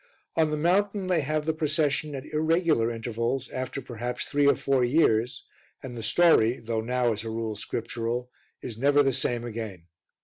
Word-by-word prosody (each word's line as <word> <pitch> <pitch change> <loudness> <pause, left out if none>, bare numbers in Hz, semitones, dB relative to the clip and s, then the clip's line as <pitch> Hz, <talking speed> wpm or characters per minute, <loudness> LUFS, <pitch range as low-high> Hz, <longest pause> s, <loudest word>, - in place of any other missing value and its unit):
On 160 -1 +3
the 150 - -1
mountain 195 +5 +1
they 180 -3 +2
have 150 +2 -1
the 160 - +1
procession 150 -1 0
at 135 +1 -6
irregular 160 -5 +2
intervals, 115 +2 -2
after 130 +1 -4
perhaps 120 0 -4
three 145 0 +2
or 140 - +5
four 135 -2 +1
years, 120 -3 +2 0.4
and 125 -2 -7
the 115 - -5
story, 120 -1 +4
though 115 -1 -2
now, 120 0 +1
as 110 +1 -5
a 115 - -5
rule, 110 -1 -3
scriptural, 120 +2 -3 0.3
is 115 -2 -6
never 145 +2 +4
the 135 -1 +2
same 120 -2 0
again. 110 -6 -6
125 Hz, 175 wpm, -27 LUFS, 115-150 Hz, 0.4 s, or